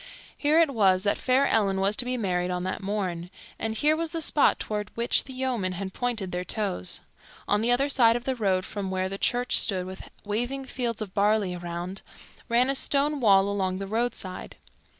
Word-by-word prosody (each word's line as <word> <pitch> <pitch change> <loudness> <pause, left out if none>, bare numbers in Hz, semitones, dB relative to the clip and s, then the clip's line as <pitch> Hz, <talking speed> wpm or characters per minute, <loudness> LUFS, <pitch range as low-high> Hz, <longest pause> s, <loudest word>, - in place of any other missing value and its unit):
Here 300 +2 +2
it 320 -4 +3
was 190 -5 +3
that 205 - +1
fair 260 +2 +3
Ellen 200 -6 +2
was 195 +2 +2
to 250 - +2
be 250 0 -1
married 180 -5 -1
on 180 0 -2
that 185 +3 -3
morn, 185 -4 -3 0.3
and 220 0 -2
here 300 +6 +3
was 330 0 -2
the 330 - -3
spot 300 -2 +3
toward 210 -1 -4
which 235 +1 +1
the 265 - -8
yeomen 250 -8 -1
had 190 +1 -5
pointed 225 -7 -2
their 180 0 -2
toes. 190 - -1 0.5
On 205 +1 +2
the 230 - +1
other 255 +3 +3
side 235 -5 +4
of 240 - -3
the 265 - -1
road 190 -5 0
from 200 -2 -5
where 185 0 -1
the 195 +1 -5
church 245 +1 +2
stood 185 -4 +1
with 190 +1 -9 0.2
waving 245 +6 -2
fields 235 -4 -2
of 190 -3 -11
barley 205 -2 +2
around, 175 +2 -6 0.5
ran 240 +2 +3
a 275 - +1
stone 285 +2 +2
wall 200 -5 +5
along 190 -2 -1
the 195 - -4
roadside. 220 -3 -3
210 Hz, 205 wpm, -26 LUFS, 190-245 Hz, 0.5 s, wall